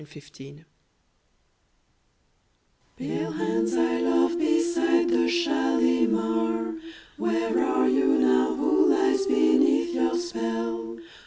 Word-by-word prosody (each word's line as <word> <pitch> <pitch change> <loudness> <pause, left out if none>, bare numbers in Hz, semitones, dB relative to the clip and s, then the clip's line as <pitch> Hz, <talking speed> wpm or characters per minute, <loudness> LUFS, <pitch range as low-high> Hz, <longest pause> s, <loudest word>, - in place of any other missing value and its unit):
Kashmiri 150 -1 -16
Song 145 +3 -15 2.3
Pale - - -4
hands 115 +1 -2
I 115 0 0
love 90 - +1
beside 335 0 +1
the 340 - +1
Shalimar, 110 - 0 0.4
Where 115 0 -1
are 65 0 +1
you 65 - +2
now? 65 0 +2
Who 355 - +2
lies 385 +1 +1
beneath 345 - +2
your - - 0
spell? 115 - -4
115 Hz, 95 wpm, -24 LUFS, -, 2.3 s, you